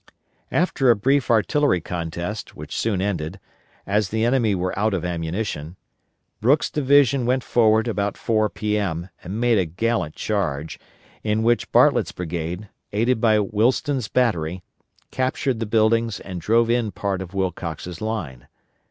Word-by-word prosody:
After 155 -7 +2
a 120 - +7
brief 135 +4 +1
artillery 120 - +3
contest, 85 +5 -5
which - - -8
soon 100 -5 0
ended, 90 -2 -3 0.5
as 100 -1 +1
the 110 +2 0
enemy 120 -4 +2
were 90 0 -2
out 105 +1 +1
of 90 - -3
ammunition, 85 -1 -3 0.6
Brooks' 135 +7 +2
division 140 -3 +3
went 130 0 +1
forward 110 -1 +3
about 100 -3 -1
4 110 -2 +1
P.M., 100 -6 -2
and 100 +5 -5
made 120 -3 +3
a 95 - +1
gallant 90 -1 -1
charge, 80 -8 -2 0.4
in 110 0 0
which 120 +1 +1
Bartlett's - - +4
brigade, 85 +3 -4 0.2
aided 115 +3 +1
by 110 -2 +4
Willston's 115 +4 +1
battery, 90 -9 0 0.5
captured 130 -1 -1
the 115 - -2
buildings 115 0 +2
and 90 -3 -7
drove 115 +4 +3
in 120 -2 +1
part 100 -2 -2
of 95 +1 -8
Wilcox's 90 -2 -3
line. 95 - -4
105 Hz, 145 wpm, -23 LUFS, 90-115 Hz, 0.6 s, a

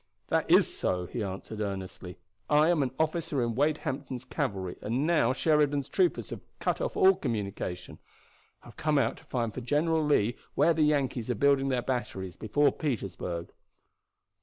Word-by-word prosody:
"That - - +1
is - - +5
so," 90 -1 -1
he 115 +6 -5
answered 100 +2 -5
earnestly. 95 -2 -5 0.3
"I 150 +2 +5
am 170 -4 +3
an 135 - +1
officer 160 -4 0
in 115 -1 -1
Wade 145 +5 +2
Hampton's 130 -2 -4
cavalry, 95 -7 -3
and, 120 +7 -1
now 155 -8 +3
Sheridan's 145 -1 +2
troopers 365 -2 +1
have - - -6 0.2
cut - - -1
off - - -2
all 385 -2 +7
communication, 100 - -4 0.6
I - - -13
have - - -16
come 155 -1 +1
out 115 -4 +1
to - - -16
find 115 -4 -2
for 130 - -5
General 155 +6 +1
Lee 125 -6 +2 0.2
where 170 - +4
the 160 - 0
Yankees 140 -6 +1
are 125 - +1
building 135 +3 +3
their 125 -2 0
batteries 95 -8 -3
before 140 +6 +2
Petersburg." 95 - -4
130 Hz, 170 wpm, -29 LUFS, 105-150 Hz, 0.6 s, all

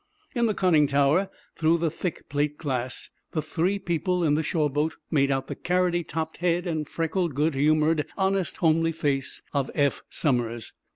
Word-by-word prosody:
In 235 -3 +2
the 215 - 0
conning 160 -6 +4
tower, 145 +7 +3 0.3
through 165 +1 +3
the 165 -2 0
thick 170 +1 -4
plate 145 +1 -1
glass, 130 -5 -3 0.2
the 155 - 0
three 175 +6 0
people 180 -1 -1
in 150 -3 +3
the 155 - +2
shore 155 0 +1
boat 150 +3 -1 0.2
made 140 -4 +3
out 135 -1 0
the - - -5
carroty 180 -1 +1
topped 160 0 -4
head 175 0 +1
and 160 -4 -2
freckled, 165 -1 -1
good 150 +3 +2
humored, 155 +2 +2
honest, 190 -2 0
homely 165 0 +2
face 140 -4 -2
of 140 -2 0
Eph 145 -2 +1
Somers. 120 -5 -1
160 Hz, 175 wpm, -26 LUFS, 145-175 Hz, 0.3 s, conning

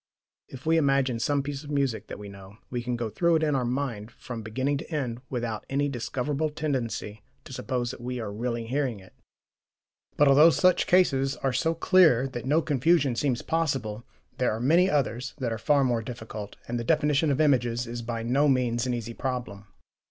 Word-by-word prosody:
If 130 -1 -11
we 165 +1 +3
imagine 135 -5 +2
some 140 +3 +1
piece 140 0 -5
of 145 - -10
music 140 -6 -1
that - - -7
we 105 0 -9
know, 100 +1 -12
we 120 -1 -2
can 125 0 -2
go 120 -1 -2
through 170 +9 +2
it 160 - +1
in 150 -1 +1
our 130 - +1
mind 120 -4 -3
from 120 -1 -8
beginning 130 +6 -1
to 165 - -10
end 125 -6 -3
without 120 -4 -3
any 145 +1 0
discoverable 135 +4 -2
tendency 130 -8 -3 0.2
to - - -11
suppose 125 -2 -2
that - - -10
we 125 +1 -4
are 110 -3 -4
really 115 +1 -3
hearing 130 -3 -1
it. 95 0 -17 1.0
But 145 - +5
although 145 +4 +7
such 180 +2 +3
cases 135 -7 +3
are 135 -1 +1
so 160 +6 +1
clear 160 -8 +4
that 120 -1 -6
no 155 +4 +3
confusion 145 -2 +2
seems 125 -1 -1
possible, 135 -10 -1 0.4
there 125 - +2
are 110 - -3
many 165 +9 +4
others 135 - -1
that 125 -5 -2
are 110 - -5
far 145 +3 +3
more 120 -3 +1
difficult, 110 -3 -7
and 120 0 -2
the - - -3
definition 150 +2 +2
of 140 - 0
images 125 -5 +2
is 120 0 -5
by 115 -1 -4
no 135 +5 +2
means 125 -2 +1
an 125 - 0
easy 115 0 -5
problem. 125 -6 -4
130 Hz, 200 wpm, -27 LUFS, 115-145 Hz, 1.0 s, although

